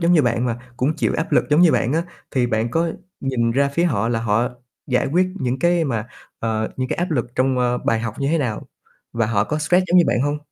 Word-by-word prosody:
giống 170 Hz, +1 st, +3 dB
như 155 Hz, -, +5 dB
bạn 120 Hz, -1 st, +1 dB
mà 120 Hz, 0 st, -2 dB, 0.2 s
cũng 145 Hz, +5 st, 0 dB
chịu -, -, 0 dB
áp 160 Hz, -, -3 dB
lực -, -, +4 dB
giống 150 Hz, +3 st, +5 dB
như 175 Hz, -3 st, +6 dB
bạn 125 Hz, -, +1 dB
á, 165 Hz, +2 st, +1 dB, 0.3 s
thì 125 Hz, -2 st, +1 dB
bạn 110 Hz, 0 st, -1 dB
có 165 Hz, +4 st, +1 dB, 0.3 s
nhìn 125 Hz, -4 st, 0 dB
ra 140 Hz, +4 st, +2 dB
phía 170 Hz, +5 st, 0 dB
họ 115 Hz, -, +1 dB
là 115 Hz, -1 st, 0 dB
họ 115 Hz, +3 st, +1 dB, 0.4 s
giải 125 Hz, -2 st, +1 dB
quyết 185 Hz, +2 st, +3 dB
những 130 Hz, 0 st, -1 dB
cái 175 Hz, -1 st, +2 dB
mà, 115 Hz, -5 st, -2 dB, 0.3 s
ờ, 110 Hz, -1 st, -1 dB
những 130 Hz, 0 st, -2 dB
cái -, -, -2 dB
áp 175 Hz, 0 st, -2 dB
lực 120 Hz, -6 st, 0 dB
trong, 130 Hz, 0 st, +1 dB
ơ, 125 Hz, 0 st, +1 dB
bài 115 Hz, -1 st, 0 dB
học 115 Hz, -2 st, -4 dB
như 140 Hz, 0 st, 0 dB
thế 165 Hz, -, +2 dB
nào 120 Hz, -7 st, -3 dB, 0.5 s
và 115 Hz, -2 st, 0 dB
họ 105 Hz, -2 st, +1 dB
có 150 Hz, -, -2 dB
stress 180 Hz, +4 st, +2 dB
giống 180 Hz, +1 st, +4 dB
như 175 Hz, -, +6 dB
bạn 125 Hz, -, +1 dB
hông? 145 Hz, +2 st, 0 dB
130 Hz, 260 wpm, -21 LUFS, 115-160 Hz, 0.5 s, như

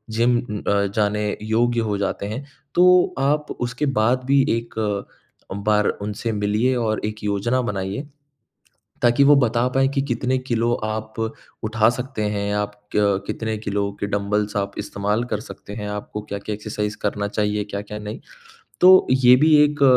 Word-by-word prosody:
Gym 120 Hz, +1 st, +3 dB
अ, 100 Hz, -3 st, -1 dB
जाने 105 Hz, 0 st, +1 dB
योग्य 115 Hz, +2 st, +1 dB
हो 105 Hz, -2 st, -1 dB
जाते 100 Hz, 0 st, -2 dB
हैं। 125 Hz, +7 st, -5 dB, 0.3 s
तो 180 Hz, +1 st, +5 dB
आप 150 Hz, +2 st, +1 dB
उसके 125 Hz, +4 st, -2 dB
बाद 125 Hz, +4 st, +2 dB
भी 140 Hz, +1 st, +4 dB, 0.2 s
एक 115 Hz, 0 st, -7 dB, 0.8 s
बार 105 Hz, +1 st, +1 dB
उनसे 105 Hz, +3 st, -3 dB
मिलिए 105 Hz, +5 st, +1 dB
और 110 Hz, -3 st, -1 dB
एक 105 Hz, 0 st, -5 dB
योजना 105 Hz, +5 st, 0 dB
बनाइए 100 Hz, +4 st, -3 dB, 1.0 s
ताकि 120 Hz, +3 st, +4 dB
वो 145 Hz, 0 st, +7 dB
बता 120 Hz, -1 st, +2 dB
पाएँ 135 Hz, 0 st, +3 dB
कि 135 Hz, -, +1 dB
कितने 130 Hz, -1 st, -1 dB
किलो 120 Hz, -2 st, 0 dB
आप 110 Hz, 0 st, -4 dB, 0.5 s
उठा 110 Hz, 0 st, +3 dB
सकते 125 Hz, -2 st, -4 dB
हैं, 100 Hz, 0 st, -2 dB
आप 105 Hz, 0 st, -1 dB, 0.2 s
क 100 Hz, -2 st, +2 dB
कितने 110 Hz, -1 st, -3 dB
किलो 100 Hz, -1 st, -2 dB
के 100 Hz, -, -1 dB
डम्बल्स 105 Hz, +1 st, -1 dB
आप 100 Hz, 0 st, -1 dB
इस्तेमाल 105 Hz, +4 st, -1 dB
कर 105 Hz, -4 st, -3 dB
सकते 105 Hz, -2 st, -10 dB
हैं, 105 Hz, -1 st, -5 dB
आपको 105 Hz, 0 st, -5 dB
क्या-क्या 100 Hz, +1 st, -5 dB
एक्सरसाइज़ 105 Hz, 0 st, -4 dB
करना 100 Hz, 0 st, -1 dB
चाहिए 105 Hz, 0 st, -1 dB
क्या-क्या 100 Hz, +1 st, -6 dB
नहीं। 105 Hz, 0 st, -7 dB, 0.6 s
तो 185 Hz, +1 st, +8 dB
ये 125 Hz, -1 st, +6 dB
भी 155 Hz, +3 st, +5 dB
एक 150 Hz, -1 st, +1 dB
110 Hz, 160 wpm, -22 LUFS, 105-125 Hz, 1.0 s, तो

